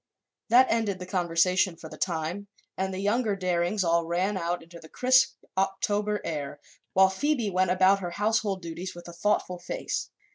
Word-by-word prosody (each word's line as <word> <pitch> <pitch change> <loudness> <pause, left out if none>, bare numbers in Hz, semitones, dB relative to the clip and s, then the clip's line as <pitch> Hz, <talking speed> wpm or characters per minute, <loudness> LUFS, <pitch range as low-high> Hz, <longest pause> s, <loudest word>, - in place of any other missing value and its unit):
That 250 +3 +7
ended 220 -4 0
the 180 - -7
conversation, 180 0 +1
for 160 - -10
the 155 - -10
time, 170 +4 -3 0.3
and 190 0 -2
the 185 - -5
younger 210 +2 +1
Darings 185 +1 0
all 170 -1 +2
ran 185 +4 0
out 175 -1 -2
into 170 +1 -13
the 160 - -14
crisp 255 0 +3 0.2
October 205 +2 0
air 145 -2 -4 0.3
while 190 0 +6
Phoebe 240 +1 0
went 185 0 +2
about 185 +2 +4
her 180 -2 -4
household 205 0 0
duties 170 +2 -6
with 175 0 -11
a 175 - -9
thoughtful 180 -1 0
face. 175 - -4
185 Hz, 175 wpm, -27 LUFS, 170-205 Hz, 0.3 s, That